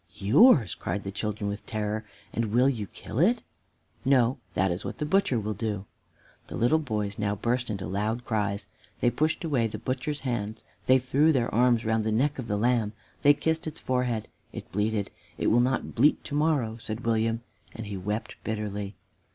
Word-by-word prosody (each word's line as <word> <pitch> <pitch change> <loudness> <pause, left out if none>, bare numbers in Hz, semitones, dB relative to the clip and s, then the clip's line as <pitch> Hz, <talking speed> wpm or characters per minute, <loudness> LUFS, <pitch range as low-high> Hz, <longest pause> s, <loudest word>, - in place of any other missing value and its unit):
"Yours!" 115 - +6
cried 100 - -3
the 100 - -4
children 105 0 -3
with 100 +1 -4
terror; 110 0 -2 0.3
"and 115 - 0
will 120 +5 +3
you 115 -7 -1
kill 110 +5 -6
it?" 220 +9 +3 0.6
"No, 130 -1 +3 0.2
that 95 0 +2
is 90 +3 -3
what - - -5
the 150 - -2
butcher 150 -7 +2
will 105 0 -2
do." 105 -2 -3 0.6
The - - -7
little 135 +7 +3
boys 105 -8 -3
now 105 0 0
burst 120 +4 -1
into 100 -3 -3
loud 105 +7 -2
cries. 105 -2 -1 0.3
They 120 - +3
pushed 155 +5 0
away 135 -8 +1
the 105 - -6
butcher's 130 +6 -3
hand; 110 -4 -3 0.2
they 130 - +7
threw 135 +5 +3
their 125 -5 0
arms 120 0 +3
round 110 0 +1
the 110 - 0
neck 135 +6 +1
of 125 - -4
the 105 - 0
lamb; 115 -1 +2 0.3
they 145 0 +6
kissed 160 +3 -1
its 155 - -5
forehead. 125 -4 -1 0.2
It - - -8
bleated. 105 0 0 0.3
"It - - +1
will 120 - +5
not 130 +2 0
bleat 150 - +3
to - - -8
morrow!" 145 -7 +1
said 115 +1 -5
William, 115 0 +1 0.3
and 115 - -6
he 100 -1 -5
wept 105 +4 -3
bitterly. 105 -2 -3
115 Hz, 190 wpm, -27 LUFS, 105-130 Hz, 0.6 s, they